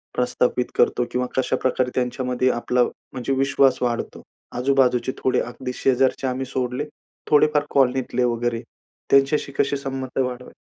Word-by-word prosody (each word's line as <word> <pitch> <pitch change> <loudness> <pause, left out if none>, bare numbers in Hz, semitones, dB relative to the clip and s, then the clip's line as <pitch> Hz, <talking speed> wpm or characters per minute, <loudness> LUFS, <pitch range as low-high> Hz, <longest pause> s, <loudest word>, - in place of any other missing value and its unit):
प्रस्थापित 125 0 0
करतो 120 - +2
किंवा 125 0 -1
कशा 130 0 +1
प्रकारे 130 -1 +1
त्यांच्यामध्ये 125 0 0
आपला 125 +1 +1
म्हणजे 130 +2 -4
विश्वास 135 0 +3
वाढतो, 120 -1 -2 0.4
आजूबाजूचे 125 -1 +2
थोडे 130 - +2
अगदी 125 +1 -6
शेजारचे 130 0 +1
आम्ही 130 +1 -2
सोडले. 130 +2 -2 0.5
थोडेफार 150 0 +4
कॉलनीतले 130 -2 +2
वगैरे 120 -1 0 0.5
त्यांच्याशी 140 +1 +3
कसे 140 0 +1
संबंध 135 -1 -4
वाढवाय? 125 0 -7
130 Hz, 130 wpm, -22 LUFS, 125-135 Hz, 0.5 s, थोडेफार